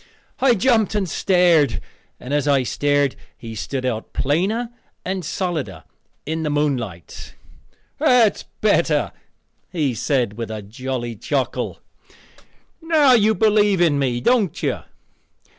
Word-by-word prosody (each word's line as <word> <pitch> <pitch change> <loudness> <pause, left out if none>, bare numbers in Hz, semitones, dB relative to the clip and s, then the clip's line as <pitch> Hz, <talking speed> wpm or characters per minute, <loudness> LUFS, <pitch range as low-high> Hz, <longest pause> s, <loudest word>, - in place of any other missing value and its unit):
I 260 -3 +4
jumped 220 -1 +2
and 200 -3 0
stared, 170 - +3 0.4
and 130 - -6
as 145 0 +1
I 140 -2 +3
stared 145 +1 +1 0.2
he 115 -1 -8
stood 110 - -4
out 115 -3 -3
plainer 195 - 0 0.3
and 185 0 -3
solider 175 -2 -3 0.4
in 160 +2 -3
the 155 - -1
moonlight. 130 - -3 0.6
"That's 235 -4 +3 0.2
better," - - +2 0.6
he 150 -7 0
said 120 -3 -1
with 115 - -4
a 110 -1 -6
jolly 120 +2 -5
chuckle; 135 +5 -2 1.0
"now 315 -4 +4
you 220 -2 +4
do - - -14
believe 210 -3 +4
in 160 -5 +3
me, 125 -3 0
don't 215 - +1
you? - - 0
150 Hz, 125 wpm, -21 LUFS, 125-205 Hz, 1.0 s, I